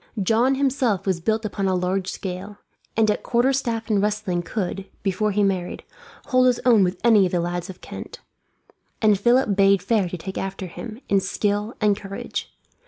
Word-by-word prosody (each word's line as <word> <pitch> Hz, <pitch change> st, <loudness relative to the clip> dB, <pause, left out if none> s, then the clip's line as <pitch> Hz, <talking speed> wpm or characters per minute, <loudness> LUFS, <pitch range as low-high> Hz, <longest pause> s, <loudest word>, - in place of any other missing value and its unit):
John 235 Hz, +7 st, +3 dB
himself 255 Hz, -8 st, +1 dB
was 190 Hz, -3 st, 0 dB
built 220 Hz, +5 st, 0 dB
upon 200 Hz, -2 st, -2 dB
a 190 Hz, -, +1 dB
large 185 Hz, +1 st, -1 dB
scale, 190 Hz, +2 st, -5 dB, 0.4 s
and 220 Hz, -1 st, +4 dB
at -, -, -2 dB
quarterstaff 240 Hz, -2 st, 0 dB
and 210 Hz, -3 st, +2 dB
wrestling 205 Hz, -4 st, -1 dB
could, 195 Hz, 0 st, -4 dB, 0.2 s
before 205 Hz, +2 st, 0 dB
he 205 Hz, 0 st, +1 dB
married, 185 Hz, -3 st, -1 dB, 0.5 s
hold 255 Hz, -1 st, +4 dB
his 250 Hz, -1 st, +2 dB
own 230 Hz, -5 st, +6 dB
with 180 Hz, 0 st, -1 dB
any 215 Hz, -5 st, +5 dB
of -, -, -7 dB
the 175 Hz, -, +1 dB
lads 175 Hz, +1 st, -3 dB
of 185 Hz, -, -10 dB
Kent; -, -, -8 dB, 0.8 s
and 210 Hz, -3 st, +3 dB
Philip 240 Hz, -1 st, +3 dB
bade 195 Hz, -1 st, +4 dB
fair 210 Hz, -6 st, +1 dB
to 180 Hz, -, -5 dB
take 190 Hz, +3 st, -6 dB
after 195 Hz, 0 st, -4 dB
him, 215 Hz, +6 st, -8 dB
in 195 Hz, -, +3 dB
skill 205 Hz, +3 st, -1 dB
and 210 Hz, -2 st, +3 dB
courage. 200 Hz, -1 st, -6 dB
200 Hz, 180 wpm, -23 LUFS, 190-225 Hz, 0.8 s, own